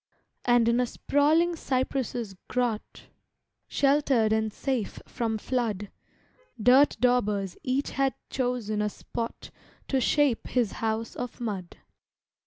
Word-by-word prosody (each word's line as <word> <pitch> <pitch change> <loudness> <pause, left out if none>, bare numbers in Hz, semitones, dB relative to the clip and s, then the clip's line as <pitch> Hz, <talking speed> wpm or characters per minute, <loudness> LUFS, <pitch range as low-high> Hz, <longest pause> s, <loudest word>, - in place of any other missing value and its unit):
And 240 -2 +4
in 235 +1 +3
a 250 - +2
sprawling 315 +7 +2
cypress' 255 -6 -2
grot, 240 -4 -2 0.6
Sheltered 275 -6 +3
and 220 0 +1
safe 255 -2 -2
from 225 -2 -2
flood, 215 -4 -2 0.7
Dirt 255 +6 +5
daubers 210 -6 +1
each 260 +2 -1
had 270 -1 +1 0.2
chosen 245 -5 -1
a 210 - +1
spot 230 +2 -6 0.4
To 265 -1 +2
shape 280 -2 +2
his 240 -6 +1
house 225 0 -2
of 245 -1 -5
mud. 200 -7 -4
240 Hz, 115 wpm, -27 LUFS, 220-265 Hz, 0.7 s, Dirt